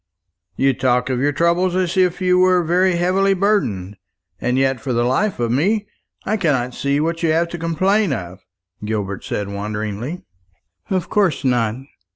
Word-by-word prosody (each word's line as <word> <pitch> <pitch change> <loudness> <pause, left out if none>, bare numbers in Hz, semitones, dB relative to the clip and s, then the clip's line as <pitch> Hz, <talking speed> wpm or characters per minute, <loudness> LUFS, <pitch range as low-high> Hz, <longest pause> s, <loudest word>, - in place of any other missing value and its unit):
"You 135 +5 +2
talk 125 0 +1
of 125 - -1
your 145 +3 +2
troubles 170 +4 +1
as 185 -1 0
if 185 -1 +2
you 180 0 +3
were 185 -1 +4
very 180 +2 +2
heavily 190 +3 +2
burdened; 110 - 0 0.4
and 125 +6 0
yet, 135 -1 +1
for 130 +2 -2
the 120 0 +1
life 150 - 0
of 120 -1 0
me, 200 - +1 0.4
I 215 +2 0
cannot 135 - 0
see 140 +3 0
what 165 +2 -1
you 165 - +1
have 170 +2 +1
to 175 - -6
complain 185 +4 +1
of," 90 -6 -5 0.4
Gilbert 105 -3 -3
said 105 - -3
wonderingly. 105 - -4 0.7
"Of 185 -2 -1
course 190 -10 +1
not. 115 -4 +1
155 Hz, 170 wpm, -20 LUFS, 120-185 Hz, 0.7 s, were